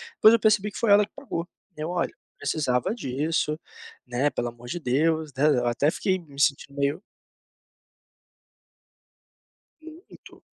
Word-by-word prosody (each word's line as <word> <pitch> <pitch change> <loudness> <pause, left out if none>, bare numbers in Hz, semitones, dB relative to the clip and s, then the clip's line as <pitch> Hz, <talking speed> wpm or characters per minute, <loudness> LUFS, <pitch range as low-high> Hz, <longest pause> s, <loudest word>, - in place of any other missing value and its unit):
Depois 220 - +7
eu 230 - +4
percebi 210 -1 +2
que - - -9
foi 225 -3 +2
ela 205 0 +7
que - - -29
pagou. 195 -11 -5 0.3
Eu: 155 +2 -3
"Olha, 180 0 0
não - - -29
precisava 130 - 0
disso, 150 - -1 0.5
né, 125 +4 +1
pelo 120 - -2
amor 120 +1 -13
de 175 - -4
Deus, 155 +3 +1
né." 150 +3 +4
Eu 125 -5 +2
até 140 +6 +2
fiquei 190 -1 0
me 145 -5 -13
sentindo 140 -1 +1
meio 145 +7 0 2.8
Muito. 320 +3 -14
155 Hz, 150 wpm, -26 LUFS, 140-200 Hz, 2.8 s, Depois